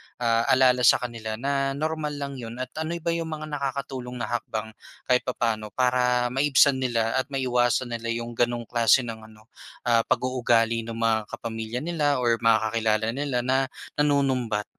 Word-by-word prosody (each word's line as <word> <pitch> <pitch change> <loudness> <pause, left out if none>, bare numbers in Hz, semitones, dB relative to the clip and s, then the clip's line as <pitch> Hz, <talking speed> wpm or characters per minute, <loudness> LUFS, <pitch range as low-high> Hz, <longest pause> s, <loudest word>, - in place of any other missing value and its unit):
ah, 115 -1 +1
alala 130 -1 +4
sa - - +8
kanila 115 -3 -4
na 135 +3 -1
normal 155 0 -2
lang 140 -2 -5
'yon? 115 -1 -7
At 130 - -9
ano 160 +2 -2
ba 170 - +1
'yong 165 -1 -2
mga 155 -1 -6
nakakatulong 135 -3 -4
na 120 -2 -4
hakbang 110 -2 -3 0.4
kahit 125 +1 +2
papano 115 -4 -1
para 125 -1 +2
maibsan 135 0 +4
nila 120 -1 0
at 130 - -2
maiwasan 125 -2 0
nila 115 0 -4
'yong 120 0 -5
gano'ng 120 0 0
klase 120 +2 +3
ng 110 -2 -7
ano, 110 +1 -20 0.3
ah, 115 -1 +3
pag-uugali 115 -3 +1
ng 115 - -5
mga 115 -1 +2 0.2
kapamilya 115 +2 -5
nila 155 -4 +1
or 115 -1 +2
mga 115 -1 +4
kakilala 110 -1 +1
nila 130 -1 -2
na 130 +1 +1 0.3
nanunumbat? 130 -7 +1
125 Hz, 165 wpm, -25 LUFS, 115-135 Hz, 0.4 s, sa